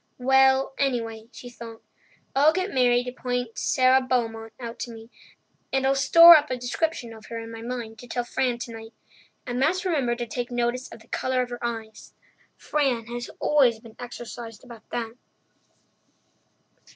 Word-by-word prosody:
"Well, 265 +1 +4
anyway," 230 -5 -1
she 250 - -11
thought, 230 -2 -11 0.5
"I'll 295 +3 +5
get 370 +3 -2
Mary 245 -2 +3
to 250 - -5
point 245 -2 -3
Sara 260 0 +4
Beaumont 225 -3 -2
out 235 -2 -7
to 240 - -5
me, 225 +1 -12 0.6
and 265 0 +1
I'll 270 - +4
store 335 +5 +9
up 300 -1 +3
a 255 - -2
description 245 -1 -2
of 220 -1 -13
her 230 - -6
in 225 0 -7
my 225 0 -8
mind 235 -2 -6
to 245 - -11
tell 245 0 -2
Fran 245 0 -1
tonight. 225 -1 -8 0.5
I 245 - -4
must 310 +10 +1
remember 275 -9 +1
to 240 0 -4
take 240 +1 -4
notice 245 +1 -2
of 230 - -11
the 225 - -19
colour 255 +1 0
of 245 - -9
her 240 - -7
eyes. 225 -2 -6 0.4
Fran 265 -6 0
has 240 0 -5
always 260 -7 +3
been 225 -1 -15
exercised 235 -2 -8
about 235 -3 -14
that." 230 -2 -4
245 Hz, 170 wpm, -25 LUFS, 230-265 Hz, 0.6 s, store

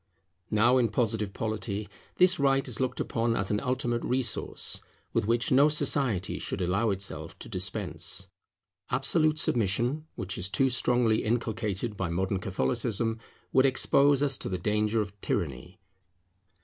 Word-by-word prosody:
Now 120 +4 +4
in 120 -2 +2
Positive 110 -2 -1
Polity, 105 -1 -3 0.3
this 180 -1 +4
right 135 -1 +2
is 120 -4 -1
looked 130 -1 -1
upon 115 0 0
as 95 -1 0
an 105 - +1
ultimate 125 -2 -1
resource, 125 -2 -2 0.3
with 100 - 0
which 115 +1 +1
no 140 +3 +6
society 135 - +1
should - - -3
allow 95 +5 +1
itself 95 -5 -3
to - - -9
dispense. 95 -2 -3 0.6
Absolute 155 +5 +2
submission, 120 +5 +1
which 95 0 -2
is 90 +3 +1
too 135 +5 +2
strongly 120 -3 +2
inculcated 110 -2 -2
by 95 -2 -2
modern 95 +3 -1
Catholicism, 115 +3 0 0.3
would 130 +1 +5
expose 140 +1 +3
us 135 -3 0
to - - -4
the 90 - -2
danger 105 +3 0
of 100 -1 -5
tyranny. 75 +4 -3
115 Hz, 145 wpm, -28 LUFS, 100-130 Hz, 0.6 s, no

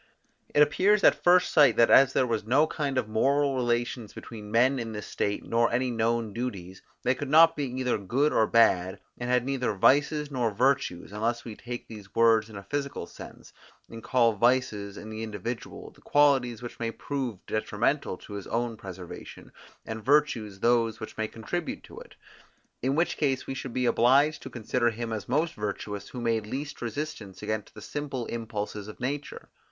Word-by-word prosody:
It 145 - +8
appears 195 +8 +3
at - - +5
first 180 +1 +5
sight 140 -8 +6
that, 115 - +5
as 135 -1 +7
there 130 - +3
was 115 -3 -1
no 130 +8 +3
kind 145 -4 -3
of 125 -4 0
moral 140 +6 +2
relations 120 -2 -1
between 105 -2 -9
men 125 +5 +3
in 115 -2 -5
this 105 -1 -6
state, 100 - -2
nor 115 0 +2
any 125 +1 0
known 115 -1 0
duties, 100 -6 -5 0.2
they 130 - +3
could 140 +1 -5
not 165 +2 +7
be 145 - -2
either 125 -2 -1
good 130 +10 +1
or 110 - +3
bad, 95 -5 +3 0.2
and 120 0 -3
had 125 -1 +2
neither 130 -5 -1
vices 145 +7 +3
nor 125 -4 0
virtues, 130 -8 +1
unless 115 +3 -2
we 115 -3 -7
take 120 +2 -7
these 105 -3 -12
words 115 -1 +4
in 110 - -11
a 100 - -8
physical 140 +7 -3
sense, - - -12 0.4
and 115 0 -8
call 120 -2 +3
vices, 105 -3 +1
in 110 - -8
the 110 0 -6
individual, 110 +2 -6
the - - -22
qualities 135 -5 +2
which 120 - -8
may 115 -1 -1
prove 130 -2 -4
detrimental 110 +2 -1
to 105 - -12
his 100 -2 -6
own 115 -1 -2
preservation, 90 -3 -10 0.3
and 110 -1 -6
virtues 120 -8 +1
those 115 -2 +2
which 110 - -8
may 110 0 -2
contribute 155 +11 -5
to - - -11
it; - - -14 0.7
in 135 +3 0
which 170 +2 +1
case 135 -3 0
we - - -4
should 130 -1 -6
be 125 +1 -1
obliged 135 +6 +4
to - - -8
consider 120 +1 0
him 115 0 -4
as 110 - -5
most 160 +3 +1
virtuous, 105 -1 -5
who 125 - -7
made 115 -2 0
least 140 +5 -5
resistance 115 -5 -5
against 110 -1 -4
the - - -10
simple 140 -5 -4
impulses 105 -3 -5
of 105 - -10
nature. 140 +3 -4
120 Hz, 190 wpm, -27 LUFS, 110-135 Hz, 0.7 s, It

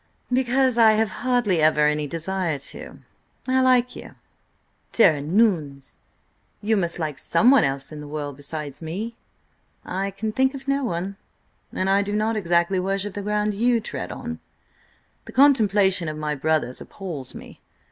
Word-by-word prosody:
"Because 255 -1 +2
I 220 -1 +7
have 215 -1 +1
hardly 240 -9 +1
ever 155 -1 +4
any 150 0 +1
desire 170 0 -2
to. 140 - -8 0.5
I 260 0 +3
like 250 -1 +3
you." - - -10 0.8
"Tare 200 -8 +5
an' 150 +8 -1
ouns! 145 - 0 0.6
you 220 +2 +1
must 170 -4 -1
like 155 -4 -4
someone 255 +4 +4
else 135 +1 -2
in 150 -1 -8
the 150 - -9
world 145 -2 -5
besides 145 0 -6
me?" 200 +9 -5 0.7
"I 195 +2 -2
can 215 +3 -4
think 265 +4 +1
of 270 0 -9
no 275 0 +1
one. 195 -2 -3 0.5
And 185 - -2
I 195 +1 +3
do 205 0 -3
not 215 +2 0
exactly 175 -1 +1
worship 195 +2 -2
the 205 - -5
ground 210 +1 0
you 235 +3 +2
tread 225 - -5
on. 240 -1 -6 0.9
The - - -11
contemplation 205 - +4
of 155 - -6
my 150 -1 -2
brothers 150 -3 -1
appals 165 -10 -7
me. - - -12
195 Hz, 160 wpm, -23 LUFS, 155-225 Hz, 0.9 s, I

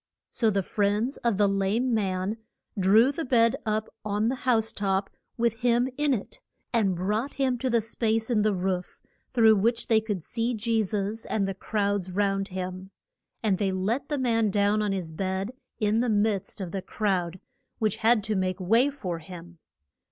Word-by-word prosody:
So 230 -3 +2
the 195 -2 0
friends 210 +7 0
of 235 -5 0
the 205 0 +4
lame 200 +6 +1
man 195 0 -1 0.4
drew 215 +6 +5
the 325 +3 -4
bed 230 -4 +3
up 215 0 0 0.2
on 210 +1 0
the 260 - -2
house 225 -2 +2
top 195 -1 -1 0.3
with 230 -1 0
him 245 0 +2
in 295 0 +1
it, 255 - -3 0.3
and 205 -6 +2
brought 210 +9 -2
him 265 -2 +1
to 260 - -1
the 235 -1 +3
space 225 +1 0
in 220 -3 +3
the 210 -1 +2
roof, 180 0 -3 0.3
through 225 -4 +5
which 230 +4 +1
they 220 -1 +4
could 205 -6 -3
see 235 +4 -1
Je 225 +1 +1
sus 210 +2 -2
and 200 -3 0
the 195 - -2
crowds 200 -1 -1
round 195 0 0
him. 185 0 -5 0.5
And 200 -4 +1
they 195 -2 +1
let 195 +8 -1
the 295 - 0
man 230 -4 +2
down 205 +1 +2
on 210 -1 0
his 180 -4 -3
bed 190 +5 -2 0.3
in 215 0 +2
the 245 0 +1
midst 205 -2 0
of 180 -3 -5
the 195 - -3
crowd, 185 -4 -1 0.4
which 215 -3 0
had 225 -1 +3
to 215 +1 -1
make 185 0 -1
way 225 +9 +3
for 185 -12 -5
him. 170 0 -11
210 Hz, 185 wpm, -27 LUFS, 195-230 Hz, 0.5 s, drew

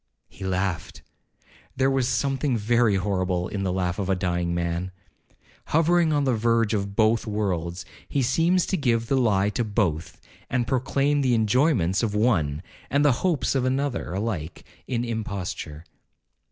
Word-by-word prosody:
He 95 - -11
laughed. 95 -1 -2 0.7
There 135 +1 +2
is 125 - +1
something 135 -2 0
very 115 0 +2
horrible 95 -2 -1
in 100 - -4
the 95 -1 -1
laugh 90 -1 -1
of 95 -1 -2
a 95 - +3
dying 90 -2 -1
man: 85 +1 -2 0.8
Hovering 165 +1 +3
on 145 -1 +2
the 130 -2 +2
verge 115 0 +1
of 100 -1 -2
both 110 +2 +2
worlds, 95 -3 -2 0.2
he 140 - 0
seems 165 +8 +2
to 190 - -1
give 115 -6 +1
the 135 - 0
lie 105 -6 +2
to 120 - -1
both, 95 -7 -1 0.3
and 120 -2 0
proclaim 140 +3 +1
the 125 -3 +2
enjoyments 110 - +2
of 110 -3 -1
one, 85 -9 +1 0.3
and 140 +2 +2
the 145 - +6
hopes 175 -7 +1
of 135 -2 +1
another, 135 -2 -1
alike 95 -6 -4 0.2
an 120 -1 -1
imposture. 95 -8 -5
110 Hz, 155 wpm, -25 LUFS, 95-130 Hz, 0.8 s, the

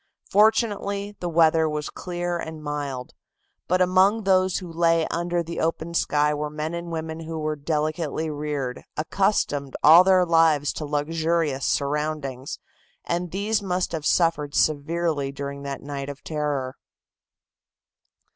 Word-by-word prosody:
Fortunately, 205 -1 +2
the 175 - -3
weather 160 -1 +4
was 150 -1 -3
clear 175 -1 -3
and 160 -2 -7
mild, 145 -4 -4 0.5
but 185 +1 +3
among 190 +4 +3
those 185 -1 +3
who 175 -3 -7
lay 165 -1 +3
under 175 0 -1
the 170 0 -6
open 165 +1 -2
sky 150 -2 +2
were 150 0 -3
men 155 +2 -4
and 170 0 -5
women 160 0 -4
who 165 0 -6
were 155 0 -2
delicately 155 +1 -2
reared, 145 -4 -3
accustomed 155 -5 0
all 165 +4 +9
their 185 -1 +4
lives 165 -4 +3
to 155 - -5
luxurious 155 -1 0
surroundings, 145 -2 -2 0.5
and 175 +1 -2
these 205 +4 -1
must 185 -2 -1
have 155 -3 -2
suffered 165 -4 +1
severely 155 -1 +1
during 140 0 -6
that 140 -1 -5
night 140 -1 -5
of 140 0 -9
terror. 145 -4 -2
160 Hz, 135 wpm, -24 LUFS, 145-175 Hz, 0.5 s, all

